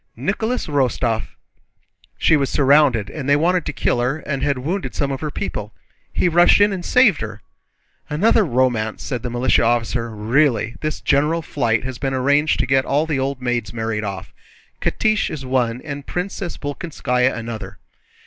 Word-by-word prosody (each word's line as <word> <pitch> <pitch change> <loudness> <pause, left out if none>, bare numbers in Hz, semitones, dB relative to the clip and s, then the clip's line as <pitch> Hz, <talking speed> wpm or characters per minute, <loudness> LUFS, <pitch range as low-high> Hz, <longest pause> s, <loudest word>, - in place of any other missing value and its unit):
Nicholas 220 +5 -2
Rostóv! 125 -6 0 0.9
She 165 - +4
was 140 -3 +1
surrounded, 140 -6 +3
and 140 -3 -5
they 145 - +6
wanted 175 +3 +1
to - - -1
kill 125 -2 0
her 125 +5 0
and 140 -3 -4
had 140 -1 0
wounded 170 +10 -3
some 140 -1 -1
of 135 - -4
her 155 - -2
people. 105 -6 -5 0.4
He - - +1
rushed 175 +3 +5
in 205 0 +4
and 185 -2 -5
saved 235 - +4
her...." 105 -1 -7 0.7
"Another 210 +8 +3
romance," 120 - 0
said 125 -5 -3
the 125 - -4
militia 120 +2 +2
officer. 115 0 0
"Really, 115 +2 +1
this 155 -1 -3
general 150 +4 +1
flight 115 -8 0
has 130 -2 -6
been 135 -1 -1
arranged 145 +4 +2
to - - +1
get 135 +1 +2
all 145 +4 +1
the 150 -4 -1
old 135 -1 -3
maids 120 -3 -2
married 110 -1 -2
off. 100 -4 -6 0.5
Catiche 215 -1 +1
is 140 -4 -6
one 125 -2 0
and 140 -2 -7
Princess 180 0 -4
Bolkónskaya 135 -4 -1
another." 115 -1 -6
135 Hz, 170 wpm, -20 LUFS, 120-155 Hz, 0.9 s, they